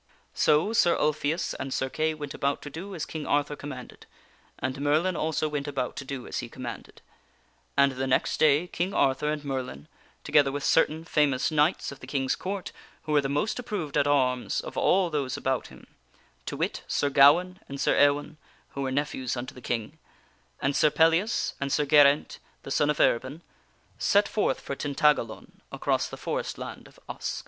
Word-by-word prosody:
So 155 Hz, +9 st, +3 dB
Sir 175 Hz, -6 st, +4 dB
Ulfius 150 Hz, +2 st, 0 dB
and 135 Hz, 0 st, -4 dB
Sir 130 Hz, -, -1 dB
Kay 155 Hz, +3 st, -1 dB
went 145 Hz, -2 st, -6 dB
about 140 Hz, 0 st, -1 dB
to 145 Hz, -, -8 dB
do 190 Hz, +6 st, -7 dB
as 160 Hz, -, -3 dB
King 155 Hz, -2 st, -6 dB
Arthur 145 Hz, 0 st, +1 dB
com 145 Hz, -, -8 dB
manded, 125 Hz, -3 st, -10 dB, 0.5 s
and 130 Hz, +1 st, -3 dB
Merlin 155 Hz, +6 st, +2 dB
also 155 Hz, -1 st, 0 dB
went 145 Hz, -1 st, -3 dB
about 135 Hz, -3 st, -3 dB
to -, -, -4 dB
do 135 Hz, -1 st, -6 dB
as -, -, -4 dB
he -, -, -6 dB
commanded; 120 Hz, -3 st, -8 dB, 0.7 s
and 140 Hz, 0 st, +5 dB
the 130 Hz, +1 st, -3 dB
next 130 Hz, -, +1 dB
day 155 Hz, +2 st, +4 dB
King 180 Hz, +2 st, -3 dB
Arthur 135 Hz, +3 st, +2 dB
and 150 Hz, -1 st, -4 dB
Merlin, 125 Hz, -, -4 dB, 0.4 s
together 145 Hz, -2 st, +3 dB
with 145 Hz, 0 st, -4 dB
certain 160 Hz, 0 st, +2 dB
famous 150 Hz, -3 st, +1 dB
knights 155 Hz, +2 st, +1 dB
of 140 Hz, -, -11 dB
the 130 Hz, -, -11 dB
King's 135 Hz, -1 st, 0 dB
Court 195 Hz, 0 st, -5 dB, 0.3 s
who 155 Hz, -, -5 dB
were 150 Hz, -1 st, +4 dB
the 135 Hz, -, -3 dB
most 150 Hz, -, -1 dB
approved 200 Hz, -, -4 dB
at -, -, +3 dB
arms 130 Hz, -3 st, +1 dB
of -, -, -7 dB
all 185 Hz, -2 st, +2 dB
those 140 Hz, -4 st, -2 dB
about 130 Hz, -1 st, -1 dB
him -, -, -15 dB, 0.6 s
to -, -, -4 dB
wit, -, -, -2 dB
Sir 145 Hz, -, 0 dB
Gawaine, 170 Hz, +7 st, +5 dB
and 140 Hz, 0 st, -6 dB
Sir -, -, +2 dB
Ewaine 145 Hz, +2 st, +2 dB, 0.3 s
(who 140 Hz, -, -6 dB
were 135 Hz, -1 st, -1 dB
nephews 130 Hz, -2 st, -2 dB
unto 120 Hz, +1 st, -5 dB
the 125 Hz, -, -12 dB
King), 115 Hz, -3 st, -4 dB, 0.6 s
and 140 Hz, 0 st, +1 dB
Sir 150 Hz, -, +4 dB
Pellias 165 Hz, +9 st, +2 dB
and 140 Hz, 0 st, -2 dB
Sir 150 Hz, -, +2 dB
Geraint, 145 Hz, 0 st, +4 dB, 0.2 s
the 135 Hz, -, -8 dB
son 145 Hz, +1 st, +2 dB
of 150 Hz, -, 0 dB
Erbin 130 Hz, +7 st, +1 dB, 0.6 s
set 205 Hz, +1 st, +3 dB
forth 205 Hz, -11 st, 0 dB
for 140 Hz, -, -5 dB
Tintagalon 145 Hz, -5 st, 0 dB
across -, -, 0 dB
the -, -, -8 dB
forest -, -, -3 dB
land -, -, -8 dB
of -, -, -20 dB
Usk. -, -, -4 dB
145 Hz, 190 wpm, -27 LUFS, 135-155 Hz, 0.7 s, and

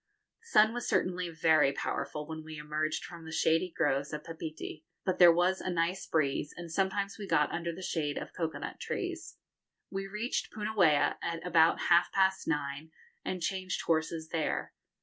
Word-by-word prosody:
The 455 Hz, -, -21 dB
sun 220 Hz, -, +5 dB
was 240 Hz, 0 st, -3 dB
certainly 180 Hz, -1 st, 0 dB
very 160 Hz, -3 st, +4 dB
powerful 150 Hz, +1 st, -3 dB
when 160 Hz, -1 st, -6 dB
we 155 Hz, 0 st, -8 dB
emerged 155 Hz, +1 st, -2 dB
from 170 Hz, -1 st, -10 dB
the 160 Hz, -, -8 dB
shady 165 Hz, +2 st, +2 dB
groves 140 Hz, -4 st, 0 dB
of 150 Hz, -1 st, -5 dB
Papeete, 160 Hz, -2 st, -7 dB, 0.2 s
but 185 Hz, -2 st, 0 dB
there 175 Hz, -1 st, +10 dB
was 180 Hz, +3 st, +2 dB
a -, -, -3 dB
nice 175 Hz, +2 st, -1 dB
breeze, 145 Hz, -2 st, 0 dB
and 170 Hz, -1 st, -7 dB
sometimes 195 Hz, +3 st, -1 dB
we 200 Hz, -, -5 dB
got 150 Hz, -4 st, +2 dB
under 170 Hz, 0 st, -2 dB
the 185 Hz, +3 st, -8 dB
shade 150 Hz, -5 st, -1 dB
of -, -, -6 dB
cocoa 165 Hz, -2 st, -2 dB
nut -, -, -6 dB
trees. -, -, -4 dB, 0.5 s
We 195 Hz, 0 st, -3 dB
reached 210 Hz, +5 st, -2 dB
Punauia 210 Hz, -8 st, +2 dB
at 165 Hz, +1 st, -3 dB
about 165 Hz, -2 st, +4 dB
half 175 Hz, 0 st, +4 dB
past 190 Hz, 0 st, +2 dB
nine, 150 Hz, 0 st, -2 dB, 0.3 s
and 180 Hz, -2 st, -3 dB
changed 185 Hz, 0 st, -2 dB
horses 160 Hz, 0 st, 0 dB
there. 160 Hz, -2 st, -2 dB
165 Hz, 175 wpm, -31 LUFS, 155-185 Hz, 0.5 s, there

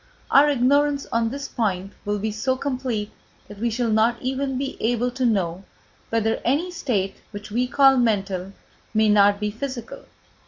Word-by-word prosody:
Our 290 Hz, +2 st, +6 dB
ignorance 285 Hz, +2 st, +2 dB
on 230 Hz, 0 st, +1 dB
this 280 Hz, +3 st, -5 dB
point 195 Hz, -4 st, -2 dB
will 205 Hz, 0 st, 0 dB
be 215 Hz, +2 st, -2 dB
so 260 Hz, +5 st, -1 dB
complete 255 Hz, -6 st, -3 dB, 0.4 s
that 205 Hz, -1 st, -11 dB
we 235 Hz, +2 st, 0 dB
shall 230 Hz, 0 st, -1 dB
not 225 Hz, +2 st, +2 dB
even 265 Hz, +1 st, -2 dB
be 275 Hz, +1 st, -3 dB
able 245 Hz, +2 st, +1 dB
to 255 Hz, 0 st, 0 dB
know 190 Hz, -4 st, 0 dB, 0.5 s
whether 225 Hz, 0 st, +1 dB
any 305 Hz, +9 st, 0 dB
state 220 Hz, -, -2 dB
which 205 Hz, 0 st, -9 dB
we 245 Hz, +3 st, 0 dB
call 270 Hz, 0 st, +5 dB
mental 195 Hz, -5 st, 0 dB, 0.4 s
may 215 Hz, 0 st, +4 dB
not 205 Hz, -1 st, +5 dB
be 210 Hz, 0 st, -1 dB
physical. 240 Hz, +1 st, -6 dB
230 Hz, 165 wpm, -23 LUFS, 210-265 Hz, 0.5 s, Our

